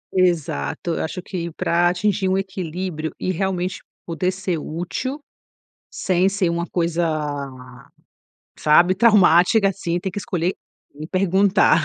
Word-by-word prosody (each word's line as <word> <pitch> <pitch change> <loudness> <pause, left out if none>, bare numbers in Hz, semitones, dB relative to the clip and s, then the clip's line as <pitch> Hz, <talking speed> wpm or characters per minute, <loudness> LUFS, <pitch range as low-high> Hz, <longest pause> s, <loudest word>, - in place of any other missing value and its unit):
Exato. 170 - 0
Eu - - -2
acho 160 +3 -4
que 170 -3 -4
para 175 +2 +2
atingir 190 +2 0
um 190 - +2
equilíbrio 185 -4 -4
e 185 - -1
realmente 185 +1 -2 0.2
poder 170 +2 -1
ser 185 -2 -3
útil, 180 - -4 0.7
sem 185 0 +1
ser 195 -3 0
uma 170 0 -2
coisa, 170 -1 -1 1.6
sabe, 175 +4 +5
traumática, 200 -1 +5
assim, 175 -3 -2
tem 190 - -3
que 205 - -4
escolher 180 -1 -1 0.4
quem 150 +2 -8
perguntar. 190 -2 +3
180 Hz, 125 wpm, -21 LUFS, 170-190 Hz, 1.6 s, sabe